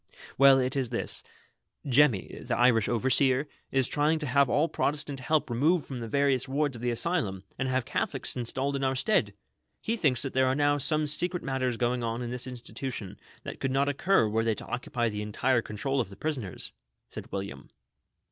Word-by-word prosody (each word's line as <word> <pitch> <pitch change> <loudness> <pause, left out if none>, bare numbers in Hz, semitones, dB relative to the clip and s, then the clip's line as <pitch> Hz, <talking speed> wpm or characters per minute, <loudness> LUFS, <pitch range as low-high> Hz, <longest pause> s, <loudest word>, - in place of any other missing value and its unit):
" - - -17
Well, 135 -1 +8
it 130 0 0
is 130 -4 -1
this: 120 - -1 0.7
Jemmy, 130 -6 +2
the - - -1
Irish 120 -3 +4
overseer, 130 +3 +2 0.2
is 135 -2 +2
trying 150 +2 +2
to 155 - -4
have 140 0 +3
all 150 +5 +3
Protestant 145 -3 -2
help 150 +4 +1
removed 145 +7 +2
from 130 -3 -6
the 115 - -5
various 140 +1 +1
wards 140 0 0
of 115 - -9
the 120 - 0
Asylum, 115 - -1 0.2
and 130 0 0
have 130 -1 0
Catholics - - -2
installed 130 +3 -1
in 135 - -2
our 130 0 +1
stead! 210 +11 +1 0.4
He 230 - -1
thinks 140 - +1
that 135 - -4
there 130 0 +3
are 130 - +2
now 145 0 +2
some 155 +2 +1
secret 175 +4 0
matters 130 -3 -1
going 120 0 0
on 115 +1 -2
in 120 - -4
this 125 +1 -3
institution, 125 -4 -6 0.3
tliat - - -7
could 135 - -1
not 135 +2 +1
occur 145 - +2
were 110 +1 0
they 115 -1 +1
to - - -8
occupy 125 -1 -2
the 105 -2 -3
entire 120 +4 +1
control 135 +6 -2
of 105 - -5
the 100 - -11
prisoners," 125 - -4 0.4
said - - -9
William. 100 0 -6
130 Hz, 200 wpm, -28 LUFS, 120-145 Hz, 0.7 s, Well